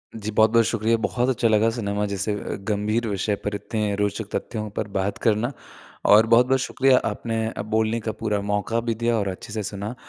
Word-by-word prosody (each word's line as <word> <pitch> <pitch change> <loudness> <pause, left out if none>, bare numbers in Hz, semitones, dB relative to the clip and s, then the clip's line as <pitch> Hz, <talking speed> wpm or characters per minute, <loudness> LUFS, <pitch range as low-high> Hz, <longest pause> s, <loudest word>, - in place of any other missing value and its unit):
जी, 110 -1 -4
बहुत-बहुत 110 +2 +4
शुक्रिया। 115 0 +1
बहुत 125 +1 0
अच्छा 120 -2 +2
लगा 110 0 +3
सिनेमा 105 -2 -1
जैसे 100 +1 -2 0.3
गंभीर 110 +2 0
विषय 100 0 -1
पर 105 0 -1
इतने 105 0 -2
रोचक 105 +1 -2
तथ्यों 110 -2 -4
पर 110 - -1
बात 95 +1 -1
करना। 115 +3 +2 0.6
और 105 +2 +7
बहुत-बहुत 125 +3 +4
शुक्रिया 135 -1 +3
आपने 110 +1 -3
अ, - - -5
बोलने 110 +2 0
का 110 0 -3
पूरा 105 -2 0
मौका 105 +3 0
भी 115 -1 -2
दिया 115 +1 +1
और 100 -2 -1
अच्छे 95 +3 -6
से 110 -1 -2
सुना। 100 +4 -5
110 Hz, 190 wpm, -24 LUFS, 105-115 Hz, 0.6 s, और